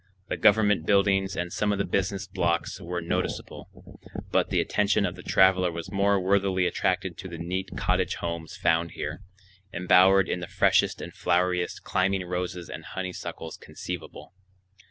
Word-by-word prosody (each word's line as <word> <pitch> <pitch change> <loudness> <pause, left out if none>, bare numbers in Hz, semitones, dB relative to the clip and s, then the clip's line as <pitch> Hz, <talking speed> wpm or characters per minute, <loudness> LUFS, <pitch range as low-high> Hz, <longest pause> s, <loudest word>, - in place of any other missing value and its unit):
The - - -1
government 105 -5 +4
buildings 95 -1 +3
and 90 0 -3
some 105 -1 0
of 100 - 0
the 100 - 0
business 95 +1 -1
blocks 85 -3 -1
were 85 0 -4
noticeable, 85 - -5 0.3
but - - +2
the - - +1
attention 100 0 +1
of 90 - -2
the 90 - -10
traveler 95 -1 +3
was 85 0 -7
more 100 0 +2
worthily 95 -1 +2
attracted 90 0 -1
to - - -6
the 85 -2 -8
neat 90 +3 -4
cottage 90 0 0
homes 85 -1 -5
found 85 +1 +1
here, - - -5 0.5
embowered 95 +2 +5
in - - -2
the 90 - -6
freshest 95 -1 +2
and - - -8
floweriest 90 0 0
climbing 95 0 0
roses 90 -1 -4
and - - -8
honeysuckles 90 -3 -6
conceivable. 90 -2 -8
90 Hz, 155 wpm, -26 LUFS, 90-95 Hz, 0.5 s, embowered